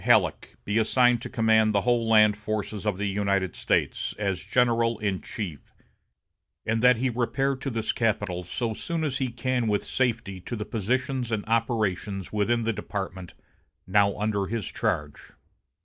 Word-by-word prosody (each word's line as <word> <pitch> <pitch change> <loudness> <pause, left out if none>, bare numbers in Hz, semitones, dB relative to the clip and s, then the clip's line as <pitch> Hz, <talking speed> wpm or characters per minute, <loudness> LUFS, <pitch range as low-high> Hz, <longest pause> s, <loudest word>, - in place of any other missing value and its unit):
Halleck - - +2
be 100 +2 +1
assigned 125 +1 +3
to - - -6
command 110 -3 +3
the 100 - +4
whole 120 -1 +1
land 105 -2 +6
forces 105 0 -4
of 100 -3 0
the 105 - -2
United 100 -2 0
States, - - 0
as 95 -4 -2
general 115 +1 +2
in 100 -3 -2
chief, 90 -10 -7 0.9
and 115 +1 0
that 125 0 +6
he 130 +2 0
repair 135 +3 0
to 135 - -4
this 115 -3 -1
capital 105 -6 -1
so 110 +6 -3
soon 165 +8 -3
as 135 -4 -1
he 130 - 0
can 120 0 -1
with 105 -1 +1
safety 115 -7 -1
to 120 - -5
the 105 -2 -4
positions 125 +3 -1
and 105 -2 -1
operations 105 -4 -1
within 115 +3 +1
the 115 0 0
department 95 -3 -5 0.5
now 100 +1 +3
under 100 -2 0
his 110 -2 -3
charge." 75 -1 -3
110 Hz, 165 wpm, -26 LUFS, 100-120 Hz, 0.9 s, land